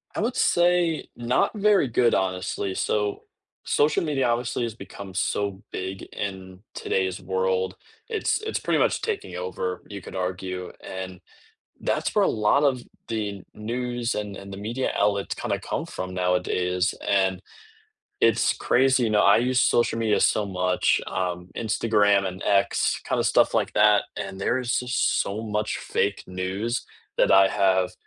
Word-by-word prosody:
I - - -2
would 240 +3 -1
say, 175 -2 +2
not 120 +1 +1
very 205 -7 +3
good, 120 0 +2
honestly, 95 +1 -1
so, 105 -1 -1 0.4
social 150 +3 +2
media, 140 -5 0
obviously, 120 0 -1
has 115 - -3
become 95 -2 -10
so 100 +1 -1
big 95 +1 -5
in 95 -2 -5
today's 95 -1 -1
world. 95 0 -1 0.3
It's 440 -1 0
it's 440 - -2
pretty - - +1
much - - +2
taking 435 - -3
over, 90 0 -4
you 100 -1 -7
could - - -10
argue, 90 0 -4
and 95 -1 -6 0.6
that's - - -1
where - - +4
a - - +3
lot 110 +7 +2
of 130 -4 +2 0.3
the 105 -4 -3
news 120 +2 -2
and 105 -2 -4
and 100 0 -9
the - - -6
media 115 +6 -2
outlets 100 -1 +1
kinda - - -2
come - - -3
from 95 0 -6
nowadays, 90 0 0
and 95 -2 +2 0.8
it's - - +4
crazy, 130 0 +3
you 110 - +1
know, 105 -1 +4
I 100 +2 +6
use 125 +1 +2
social 120 -1 +2
media 110 -2 +2
so 105 - +3
much, 90 -2 +1
um, 90 -1 -3
Instagram 105 -2 +2
and 95 0 -7
X, 100 0 +2
kinda - - +1
stuff - - +4 0.2
that, 105 -1 +5
and 95 - -5
there's 120 +3 0
just 125 0 +1
so 100 +2 -4
much 105 -1 -2
fake 100 0 -1
news 95 +6 -3 0.3
that - - +4
I 95 0 +7
have 95 -2 +2
100 Hz, 155 wpm, -25 LUFS, 95-120 Hz, 0.8 s, I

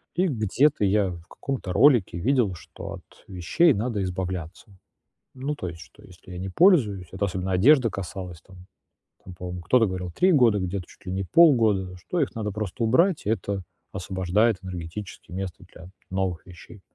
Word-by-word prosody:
и 185 +2 +2
где-то 130 - +1
я 100 -1 +2
в 85 -1 -10
каком-то 125 -7 -5
ролике 120 - +4
видел, 120 -2 +1
что 80 - -9
от - - -15
вещей 100 - +3
надо 105 -1 -2
избавляться. 90 -2 -4 0.7
Ну, 135 +3 -4
то 95 - -5
есть, 85 -1 -8
что - - -16
если 90 0 -15
я 90 - -7
не 95 +2 -4
пользуюсь- 110 - +3
это 95 +2 -1
особенно 95 0 -3
одежды 120 +7 +5
касалось- 90 -4 -7
там 90 0 -16 0.6
там, 90 - -11
по-моему, 90 0 -6
кто-то 115 +6 +3
говорил- 90 -1 -4
3 185 - +3
года, 120 -8 +4
где-то- 95 0 -3
чуть - - -19
ли 90 - -5
не 95 +1 -2
полгода, 110 - +4
что 170 - -3
их - - -1
надо 105 -3 -3
просто 105 +2 -4
убрать, 165 - +2
и - - -1
это 100 -2 -2 0.3
освобождает 95 +3 +1
энергетически 90 +1 -8
место 95 -1 -6
для 85 - -12 0.2
новых 95 -3 -2
вещей. 90 +3 -13
95 Hz, 175 wpm, -25 LUFS, 90-115 Hz, 0.7 s, одежды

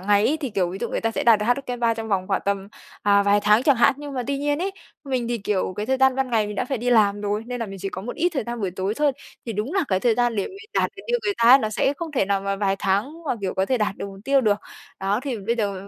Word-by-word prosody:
ngày 205 +2 +3
ấy. 310 - +1
Thì, 270 - -3
kiểu, 180 -4 0
ví 190 - -6
dụ 235 - -2
người - - -2
ta 225 - 0
sẽ - - -3
đạt 230 -3 +6
được 210 - -2
HSK 245 -1 -1
3 230 -1 +2
trong 225 0 -6
vòng 190 -2 0
khoảng 195 - +1
tầm, 200 0 -1 0.3
à 200 0 +4
vài 205 +1 +3
tháng 210 +3 +4
chẳng 280 -3 +4
hạn, 235 - +5
nhưng 290 -1 -8
mà 255 - -2
tuy 280 0 -1
nhiên 290 +1 0
ấy, 385 +3 -1 0.3
mình 255 -3 -2
thì, 240 -1 -1
kiểu, 195 -2 -1
cái 210 +1 -3
thời 265 - +1
gian 265 0 +4
ban 265 -2 -1
ngày 220 -2 +2
mình 210 - -5
đã - - 0
phải 260 -1 -3
đi 245 +2 -1
làm 205 -3 +4
rồi, 205 +1 -1
nên 245 -1 -5
là 230 - -2
mình 195 -1 -8
chỉ 195 +1 -3
có 190 0 -6
một 245 - -6
ít 345 +3 +2
thời 270 - -1
gian 235 -1 -4
buổi 190 -3 -1
tối 190 +3 -2
thôi, 290 +1 +2 0.3
thì 230 - -3
đúng 215 +8 -3
là 380 -5 +2
cái 190 -1 +1
thời 235 0 +3
gian 240 -2 +1
để 195 - 0
mình 390 - -10 0.2
đạt - - +2
được 395 - -10
như 485 0 +1
người 405 0 0
ta 230 0 +4
ấy 265 +2 +10
nó 215 -4 -2
sẽ 270 +5 +1
không 330 -1 -6
thể 250 - +2
nào 200 0 0
mà 195 0 -2
vài 195 -1 0
tháng 245 - -1
mà, 255 - +1
kiểu, 190 -2 -2
có 190 0 +1
thể 255 +2 +1
đạt 210 -2 -1
được - - -5
mục 195 0 -10
tiêu 275 0 +4
được. 210 -4 +2 0.4
Đó, 200 +4 0
thì 265 -4 -3
bây 225 +4 -1
giờ 205 -3 -1
225 Hz, 335 wpm, -23 LUFS, 200-265 Hz, 0.4 s, ấy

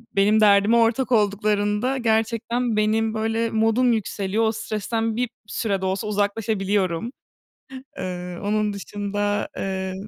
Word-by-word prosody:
benim 205 +2 +4
derdime 205 +2 +5
ortak 235 +3 +2
olduklarında 210 +3 +1
gerçekten 230 0 0
benim 220 +1 +1
böyle 225 +1 -1
modum 225 +3 +2
yükseliyor. 210 -1 -1
O 220 - +3
stresten 225 +1 -2
bir 245 0 -1 0.2
süre 200 -3 -2
de - - -2
olsa 190 +3 -2
uzaklaşabiliyorum. 205 -1 -1 0.9
Eee, 180 -1 -5
onun 210 0 0
dışında, 205 +1 -2
eee 190 -1 -3
215 Hz, 120 wpm, -23 LUFS, 200-225 Hz, 0.9 s, derdime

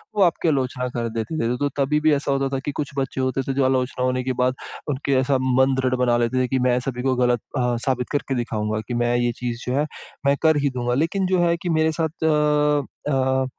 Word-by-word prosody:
वो 205 - +1
आपकी 175 -1 +1
आलोचना 130 -4 0
कर 120 -1 -1
देते 115 +8 -3
थे। 115 - 0
तो 145 +2 0
तभी 145 +2 +2
भी 155 0 +4
ऐसा 140 0 0
होता 135 0 0
था - - -1
कि 145 - -1
कुछ 145 - -1
बच्चे 135 -1 -1
होते 130 +1 0
थे 135 - 0
जो 135 0 +2
आलोचना 130 0 0
होने 130 0 0
के 130 0 -1
बाद 130 +1 +2 0.3
उनके 140 0 -1
ऐसा 130 +1 +2
मन 130 +1 +3
दृढ़ 130 -1 +1
बना 120 -1 +3
लेते 120 +2 +1
थे - - 0
कि 130 +1 0
मैं 125 0 +3
सभी 125 -2 -2
को 130 -1 +2
गलत 125 -1 +2 0.2
अ, 125 -1 +1
साबित 125 -2 -1
करके 140 -2 -1
दिखाऊँगा 110 -3 -2
कि 125 - -4
मैं 120 0 +1
ये 120 0 +1
चीज़ 120 -1 -4
जो 125 - 0
है 150 - +2 0.4
मैं 140 0 +4
कर 160 -1 +5
ही - - +3
दूँगा। 120 -2 -2
लेकिन 165 +8 0
जो 185 -1 +2
है 170 - +2
कि 180 - -2
मेरे 160 0 +3
साथ 160 0 -3
अ 150 -1 +3 0.3
अ, 130 0 +1
130 Hz, 245 wpm, -22 LUFS, 125-145 Hz, 0.4 s, कर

